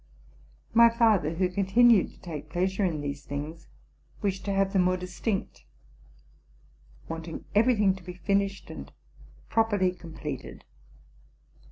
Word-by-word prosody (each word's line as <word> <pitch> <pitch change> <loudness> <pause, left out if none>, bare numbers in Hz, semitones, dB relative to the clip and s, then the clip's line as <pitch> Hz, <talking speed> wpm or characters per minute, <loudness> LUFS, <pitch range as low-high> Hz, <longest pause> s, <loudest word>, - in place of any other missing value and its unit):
My 235 0 +8
father, 215 -9 +2
who 185 +2 +2
continued 200 +3 +4
to - - -20
take 155 -4 -7
pleasure 190 +5 0
in 165 -5 0
these 140 0 -5
things, 150 +4 -6 0.6
wished 195 -1 -1
to 200 - -1
have 195 0 +1
them 190 - +4
more 185 0 +2
distinct, 180 +3 -4 1.4
wanting 165 0 -6
every 230 +4 +4
thing 205 -3 +3
to 190 -1 -11
be 180 0 -8
finished 195 +2 -1
and - - -9 0.6
properly 205 -5 +2
com 170 -2 -12
pleted. 145 -5 -6
185 Hz, 135 wpm, -28 LUFS, 165-200 Hz, 1.4 s, My